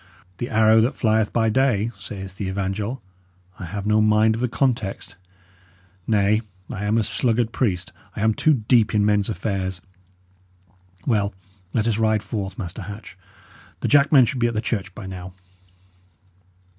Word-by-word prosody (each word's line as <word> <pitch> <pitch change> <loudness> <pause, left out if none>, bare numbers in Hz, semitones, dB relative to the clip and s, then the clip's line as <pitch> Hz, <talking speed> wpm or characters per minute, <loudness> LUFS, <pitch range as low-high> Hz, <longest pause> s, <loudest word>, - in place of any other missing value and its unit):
'The 120 - -3
arrow 110 0 +5
that 120 +5 0
flieth 110 -2 +2
by 115 -1 +2
day,' 115 -2 +2
saith 95 -1 -8
the 100 - -3
evangel; 100 +6 -3 0.6
I 95 - -5
have 100 +4 -5
no 110 +1 +3
mind 110 +1 +4
of 115 - -4
the 125 - +2
context; 115 -8 -2 0.9
nay, 105 0 +3 0.3
I 105 - -4
am 105 +2 +2
a 115 - +2
sluggard 115 +2 0
priest, 95 -9 -1 0.2
I - - -4
am 110 0 +3
too 155 +7 +3
deep 115 -4 +4
in 105 -1 +3
men's 105 0 +2
affairs. 95 -4 -2 1.3
Well, 105 -5 +1 0.4
let 110 +2 0
us 115 -1 0
ride 110 -1 +2
forth, 100 -4 -4
Master 95 +2 -5
Hatch. 100 +3 -9 0.7
The - - 0
jackmen 140 -2 +6
should 125 +2 -3
be 120 - +3
at 115 - -3
the - - +1
church 100 -4 -3
by 105 - -8
now." 90 -1 -8
110 Hz, 160 wpm, -23 LUFS, 100-115 Hz, 1.3 s, jackmen